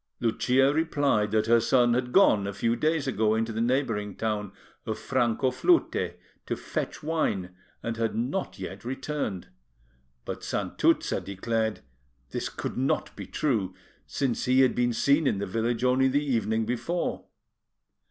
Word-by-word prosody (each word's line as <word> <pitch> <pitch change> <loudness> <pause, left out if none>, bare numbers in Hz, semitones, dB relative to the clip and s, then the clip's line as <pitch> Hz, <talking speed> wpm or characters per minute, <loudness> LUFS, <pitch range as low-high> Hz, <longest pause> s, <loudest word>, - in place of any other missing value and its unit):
Lucia 130 +4 +2
replied 145 -9 +1
that 110 +1 +1
her 115 +1 +5
son 120 +1 +3
had 125 0 -1
gone 110 - +5
a 100 - -3
few 115 +4 0
days 155 +3 0
ago 110 -5 +1
into 115 +1 -1
the 110 - -2
neighbouring 115 -5 0
town 105 -3 -2 0.4
of - - -2
Francoflute 130 - +1 0.3
to - - -1
fetch - - -4
wine, 100 - -1 0.3
and 115 0 -3
had 115 -1 -1
not 130 +12 -2
yet 95 0 -7
returned; 130 - -4 0.8
but - - -5
Santuzza - - 0
declared 110 +2 -2 0.5
this - - -3
could - - -5
not 130 +2 0
be - - -8
true, 105 -11 -1 0.3
since 135 -4 -1
he 130 +1 +4
had 130 - +4
been 120 0 +1
seen 140 +5 +3
in - - +1
the 100 - -2
village 115 +4 -1
only 130 +1 +4
the 145 +3 +1
evening 110 -4 0
before. 125 +10 -2
120 Hz, 150 wpm, -27 LUFS, 110-135 Hz, 0.8 s, her